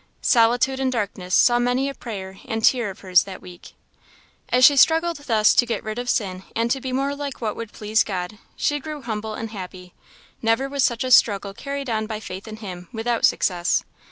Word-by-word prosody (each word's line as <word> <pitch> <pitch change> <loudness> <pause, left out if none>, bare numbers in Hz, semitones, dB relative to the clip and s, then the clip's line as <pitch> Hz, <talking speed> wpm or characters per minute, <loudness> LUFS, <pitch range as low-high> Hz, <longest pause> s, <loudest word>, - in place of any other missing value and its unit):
Solitude 245 +3 +3
and 265 -1 0
darkness 200 -6 -2
saw 240 -1 +5
many 245 +3 +1
a 275 - -4
prayer 190 -7 -8
and 225 -4 -3
tear 240 -5 +3
of 190 - -10
hers 185 -2 +4
that 190 -2 -8
week. 180 -1 -13 0.8
As 250 0 +5
she 285 - +7
struggled 325 +4 +4
thus 225 -7 +3
to - - +5
get 235 -1 -3
rid 215 +2 -4
of 245 0 -4
sin, 185 -5 -1
and 230 +1 0
to 270 - 0
be 260 - -4
more 275 +2 -1
like 285 -1 -6
what 220 -3 -3
would 230 -2 -7
please 215 +1 +1
God, 190 +1 -5 0.2
she 290 0 0
grew 300 -1 -7
humble 220 -1 -4
and 225 0 -6
happy. 180 -3 -9 0.5
Never 225 +4 +1
was 275 -1 -1
such 235 0 +1
a 255 - -3
struggle 200 -5 +4
carried 280 +5 -5
on 220 -2 -1
by 215 -1 -4
faith 195 -1 -8
in 215 - -7
Him, 180 -5 -8
without 230 +1 0
success. 175 -2 +1
225 Hz, 210 wpm, -22 LUFS, 200-260 Hz, 0.8 s, she